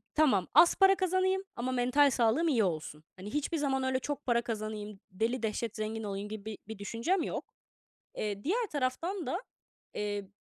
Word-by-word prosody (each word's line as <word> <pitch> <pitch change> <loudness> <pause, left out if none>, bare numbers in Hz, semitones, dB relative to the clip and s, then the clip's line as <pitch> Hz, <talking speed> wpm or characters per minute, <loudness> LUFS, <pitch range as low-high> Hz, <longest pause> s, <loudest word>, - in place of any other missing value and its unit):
Tamam, 265 -12 +4
az 340 - +7
para 390 0 +6
kazanayım 375 +1 +1
ama 255 +2 -2
mental 255 +3 +4
sağlığım 240 +8 +2
iyi 245 -8 +3
olsun. 155 -4 -3
Hani, 200 +6 -8
hiçbir 295 +3 -1
zaman 270 -3 0
öyle, 260 0 +1
"Çok 290 +1 -4
para 235 -2 +3
kazanayım, 215 -3 -5
deli 225 +5 -1
dehşet 225 +1 -2
zengin 220 0 -3
olayım." 200 0 -4
gibi 215 -1 -7
bir 220 -1 -5
bir 220 -2 -7
düşüncem 235 - 0
yok. - - -5 0.6
Eee, 205 -1 -3
diğer 445 +8 +1
taraftan 310 +7 -1
da, 360 - -2 0.5
eee, 205 -2 -3
240 Hz, 175 wpm, -31 LUFS, 210-295 Hz, 0.6 s, az